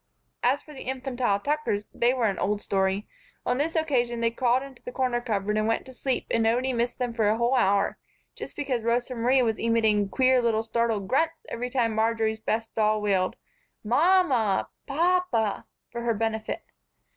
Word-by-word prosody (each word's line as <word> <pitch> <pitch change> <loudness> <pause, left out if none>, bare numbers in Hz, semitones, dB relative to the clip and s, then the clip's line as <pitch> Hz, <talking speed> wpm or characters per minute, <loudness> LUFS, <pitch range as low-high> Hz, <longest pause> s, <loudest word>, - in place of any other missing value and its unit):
As 260 +4 +2
for 300 - -13
the 270 - -9
infantile 255 -5 -1
Tuckers, 285 -6 -1
they 240 +1 +3
were 250 -3 0
an 200 -3 0
old 205 +2 0
story. 195 0 0 0.4
On 245 +2 0
this 325 +3 -1
occasion 250 -7 +1
they 230 0 +1
crawled 250 +2 +1
into 275 -3 -12
the 250 - -7
corner 250 -2 0
cupboard 210 -3 -1
and 215 0 +1
went 225 - 0
to 260 - -11
sleep 260 +1 -2
and 230 - +2
nobody 245 +4 +1
missed 240 0 -1
them 245 -2 -2
for 220 -3 +2
a 215 - +2
whole 235 +2 +1
hour, 200 -5 +2 0.3
just - - -9
because 265 -5 -2
Rosa 240 +3 0
Marie 250 +2 +3
was 225 -2 0
emitting 220 -3 +2
queer 260 +2 +3
little 225 -2 +1
startled 225 -3 -1
grunts 320 +7 0
every 245 +2 -4
time 240 -3 +1
Marjory's 220 0 0
best 225 +1 -2
doll 215 -1 +2
wailed 195 -3 +1 0.5
"Mam 350 - +4
mah!" 220 -7 +1 0.2
"Pap 360 +5 +2
pah!" 220 - 0 0.3
for 235 - -5
her 235 -1 0
benefit. 220 0 -2
235 Hz, 190 wpm, -26 LUFS, 220-260 Hz, 0.5 s, Mam